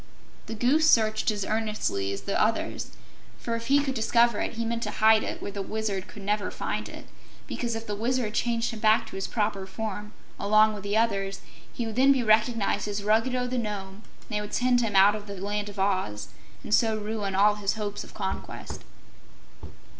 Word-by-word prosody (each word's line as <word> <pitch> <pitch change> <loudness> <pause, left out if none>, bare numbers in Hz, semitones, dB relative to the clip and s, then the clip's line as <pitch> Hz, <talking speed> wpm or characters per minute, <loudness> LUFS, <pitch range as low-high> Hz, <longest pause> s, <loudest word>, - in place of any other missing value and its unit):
The 225 - -5
Goose 285 +8 +3
searched 215 -3 +3
as 205 -2 -1
earnestly 215 - -1
as 100 - -4
the 200 - -1
others, 220 +1 0 0.5
for 230 - -3
if 230 0 -5
he 280 +1 +4
could 270 -2 -1
discover 235 -1 +3
it, - - -2
he 230 0 -3
meant 230 0 -2
to 210 - -2
hide 220 +1 +4
it - - -5
where 200 - -4
the 200 0 -4
Wizard 205 -1 -3
could 205 - -11
never 205 +1 0
find - - -4
it, - - -10 0.4
because 235 -2 -3
if 225 0 -5
the 210 - -4
Wizard 235 0 -1
changed 230 0 0
him 225 - -7
back 220 +1 +4
to - - -10
his 195 - -3
proper 205 -3 -1
form, 210 +1 -5 0.3
along 215 +1 +4
with 210 - -7
the 205 +2 -1
others, 195 -4 0 0.3
he 235 - -4
would 225 0 -5
then 270 +2 +6
be 265 -3 +2
recognized 215 -2 +2
as 205 0 -3
Ruggedo 230 +4 +2
the 250 0 -2
Nome, 205 -2 -5 0.2
and - - -23
they 210 -2 -1
would 210 0 -5
send 245 -1 +3
him 220 -4 -1
out 195 +2 +7
of 210 -1 -6
the 200 - -6
Land 205 +1 -3
of 205 - -11
Oz 185 - -1 0.3
and - - -3
so 220 -1 +3
ruin 210 -2 -3
all 205 +2 +5
his 200 +1 0
hopes 205 -2 -4
of - - -15
conquest. 190 -2 -5
215 Hz, 205 wpm, -27 LUFS, 200-230 Hz, 0.5 s, out